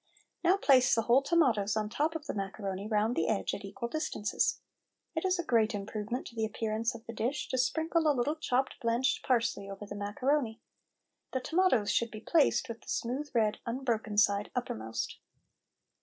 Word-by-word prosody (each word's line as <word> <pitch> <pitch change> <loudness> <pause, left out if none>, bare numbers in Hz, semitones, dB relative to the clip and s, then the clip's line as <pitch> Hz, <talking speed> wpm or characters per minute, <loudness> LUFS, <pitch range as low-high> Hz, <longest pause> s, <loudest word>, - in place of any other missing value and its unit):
Now 360 +3 +5
place 260 -9 +5
the 225 - +1
whole 240 +4 +5
tomatoes 255 - +2
on 215 -1 0
the 210 - -11
top 315 +3 0
of 310 -2 -5
the - - -3
macaroni, 195 0 -4
round 215 +2 +1
the 165 - +1
edge, 215 - 0
at 200 - -5
equal 200 +4 -5
distances. 305 -7 -1 0.6
It 320 - -1
is 370 0 +2
a 345 - -2
great 225 -7 +2
improvement 210 +4 -4
to 240 - -10
the 225 - -1
appearance 220 +2 -1
of 225 - -11
the 230 - -7
dish 240 +5 -2
to 260 - -1
sprinkle 320 +5 +1
a - - +6
little 280 +3 0
chopped 265 -4 -1
blanched 235 +2 +1
parsley 230 -5 0
over 195 +1 -7
the 205 - -7
macaroni. 225 +4 -1 0.7
The 260 - +1
tomatoes 305 - +2
should 235 - +1
be 215 - -8
placed 305 +6 +3
with 230 0 -7
the - - -14
smooth, 265 +5 -2
red, 215 -2 +2
unbroken 230 -4 -2
side 200 0 +3
uppermost. 115 - -3
230 Hz, 185 wpm, -31 LUFS, 210-275 Hz, 0.7 s, a